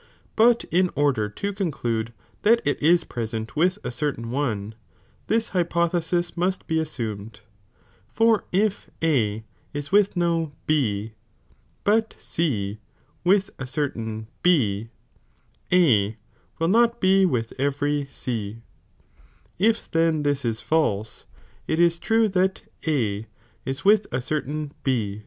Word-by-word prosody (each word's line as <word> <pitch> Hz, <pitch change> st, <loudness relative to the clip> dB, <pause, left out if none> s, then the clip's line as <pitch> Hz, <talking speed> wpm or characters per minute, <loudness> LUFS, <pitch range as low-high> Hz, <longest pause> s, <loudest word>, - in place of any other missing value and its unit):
But 235 Hz, +1 st, +5 dB
in 180 Hz, +1 st, +3 dB
order 135 Hz, -8 st, +1 dB
to 200 Hz, -, -4 dB
con 195 Hz, -3 st, -1 dB
clude 115 Hz, -5 st, -2 dB, 0.3 s
that 230 Hz, +3 st, +4 dB
it 145 Hz, -, 0 dB
is 170 Hz, +3 st, +4 dB
present 115 Hz, -1 st, -5 dB
with 180 Hz, +5 st, +2 dB
a -, -, -3 dB
certain 120 Hz, -3 st, -3 dB
one, 110 Hz, -6 st, -2 dB, 0.5 s
this 225 Hz, 0 st, +1 dB
liypolhesis 175 Hz, -1 st, 0 dB
must 185 Hz, +2 st, -1 dB
be 160 Hz, 0 st, 0 dB
assumed, 110 Hz, -8 st, -5 dB, 0.7 s
for 225 Hz, -1 st, +3 dB
if 205 Hz, +2 st, 0 dB
A 110 Hz, -9 st, +1 dB, 0.3 s
is 145 Hz, -1 st, -4 dB
with 200 Hz, -1 st, +3 dB
no 165 Hz, -3 st, 0 dB
B, 110 Hz, -8 st, 0 dB, 0.7 s
but 220 Hz, +2 st, +2 dB
C 110 Hz, -11 st, -2 dB, 0.4 s
with 195 Hz, +2 st, +3 dB
a 135 Hz, -, -4 dB
certain 115 Hz, -6 st, -3 dB, 0.2 s
B, 115 Hz, -, +2 dB, 0.8 s
A 115 Hz, -, +4 dB, 0.4 s
will 165 Hz, +1 st, +1 dB
Dot 235 Hz, +2 st, +4 dB
be 190 Hz, 0 st, +4 dB
with 120 Hz, -11 st, 0 dB
every 145 Hz, +1 st, 0 dB
C, 115 Hz, -3 st, -4 dB, 1.0 s
if 225 Hz, +3 st, +1 dB
then 165 Hz, -2 st, +2 dB
this 145 Hz, -1 st, 0 dB
is 115 Hz, -2 st, -1 dB
false, 110 Hz, -10 st, 0 dB, 0.4 s
it 160 Hz, -, 0 dB
is 170 Hz, 0 st, +3 dB
true 225 Hz, +3 st, +3 dB
that 190 Hz, 0 st, +1 dB, 0.2 s
A 115 Hz, -8 st, 0 dB, 0.4 s
ia 135 Hz, -, -1 dB
with 210 Hz, 0 st, +5 dB
a 125 Hz, -, -2 dB
certaii) 150 Hz, +2 st, -3 dB
B. 110 Hz, -6 st, 0 dB
150 Hz, 130 wpm, -24 LUFS, 115-180 Hz, 1.0 s, But